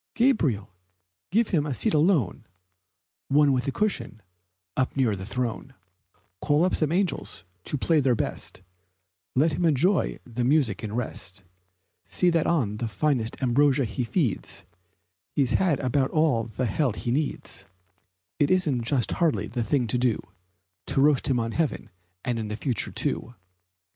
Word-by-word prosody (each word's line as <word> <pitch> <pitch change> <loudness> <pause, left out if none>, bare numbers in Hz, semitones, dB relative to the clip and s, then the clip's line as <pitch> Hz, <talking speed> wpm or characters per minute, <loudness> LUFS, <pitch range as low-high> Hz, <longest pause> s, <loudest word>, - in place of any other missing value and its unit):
Gabriel, 150 - +1 0.6
give 225 +2 +2
him 155 -5 +2
a 145 -3 -3
seat - - 0
alone 150 - +2 0.8
One 145 0 +4
with 125 0 -1
a - - +1
cushion, 130 - -2 0.5
up 130 +1 -1
near 120 -6 +2
the 95 0 -7
throne; 125 +4 -3 0.7
Call 150 +3 +3
up 185 - 0
some 155 -2 +2
angels 170 - -1 0.2
to 145 - -1
play 160 +4 +2
their 130 -3 +3
best, 95 - -4 0.7
Let 150 +4 +3
him 165 - -1
enjoy 165 +3 +2
the 120 0 -3
music 125 -6 +2
in 110 0 -4
rest, 95 -5 -4 0.6
See 180 -1 +1
that 165 -2 +1
on 110 -11 0
finest 115 +1 0
ambrosia 135 +2 +3
he 110 +3 -3
feeds, 120 - -2 0.7
He's 135 -3 +3
had 175 -7 +2
about 130 +1 +1
all 150 -8 +2
the 115 +3 -3
hell 125 +2 0
he 120 - -3
needs; 145 +3 -3 0.7
It 145 - +3
isn't 160 -9 +2
just 120 0 0
hardly 165 -4 +1
the 120 - -3
thing 125 +3 +1
to 120 +2 0
do 125 -3 +1 0.7
To - - 0
roast 145 -2 +4
him 130 -3 +2
on 115 0 -2
earth 155 - -1 0.5
and 115 -3 -2
the 105 - -3
future, 120 -1 -1
too." 120 - -2
130 Hz, 155 wpm, -26 LUFS, 115-155 Hz, 0.8 s, One